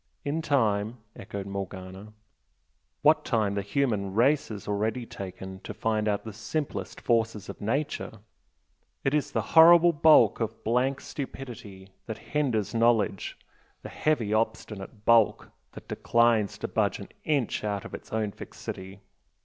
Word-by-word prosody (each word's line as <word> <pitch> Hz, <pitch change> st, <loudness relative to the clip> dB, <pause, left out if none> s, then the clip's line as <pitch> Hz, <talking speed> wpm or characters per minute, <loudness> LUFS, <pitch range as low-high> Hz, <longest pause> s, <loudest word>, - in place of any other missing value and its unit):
"In 150 Hz, +3 st, -1 dB
time!" 115 Hz, -6 st, +1 dB, 0.2 s
echoed 100 Hz, -1 st, -6 dB
Morgana 95 Hz, +1 st, -7 dB, 0.9 s
"What -, -, +5 dB
time 105 Hz, -3 st, +1 dB
the 100 Hz, -, -1 dB
human 100 Hz, -4 st, -1 dB
race 135 Hz, +6 st, +3 dB
has 105 Hz, -3 st, -8 dB
already 110 Hz, +4 st, -1 dB
taken 95 Hz, -2 st, -8 dB
to 105 Hz, -, -8 dB
find 110 Hz, 0 st, 0 dB
out 100 Hz, -1 st, 0 dB
the 110 Hz, -, -7 dB
simplest 135 Hz, +8 st, -4 dB
forces 115 Hz, -3 st, 0 dB
of -, -, -8 dB
nature! 135 Hz, +8 st, -2 dB, 0.9 s
It 135 Hz, -, +1 dB
is 150 Hz, -1 st, +1 dB
the -, -, -1 dB
horrible 170 Hz, +1 st, +8 dB
bulk 145 Hz, -8 st, +6 dB
of 115 Hz, -1 st, -4 dB
blank 125 Hz, +4 st, +1 dB
stupidity 120 Hz, -8 st, -8 dB, 0.2 s
that 110 Hz, -, -4 dB, 0.2 s
hinders 125 Hz, -9 st, 0 dB
knowledge 115 Hz, -4 st, +1 dB, 0.5 s
the -, -, -7 dB
heavy 120 Hz, -9 st, 0 dB
obstinate 110 Hz, -1 st, -3 dB
bulk 115 Hz, -2 st, +4 dB, 0.2 s
that -, -, -11 dB
declines 115 Hz, -3 st, +2 dB
to -, -, -4 dB
budge -, -, 0 dB
an -, -, -10 dB
inch 140 Hz, -9 st, 0 dB
out 100 Hz, -2 st, -2 dB
of -, -, -9 dB
its -, -, -9 dB
own 110 Hz, -2 st, -1 dB
fixity. 95 Hz, 0 st, -8 dB
110 Hz, 140 wpm, -27 LUFS, 100-130 Hz, 0.9 s, horrible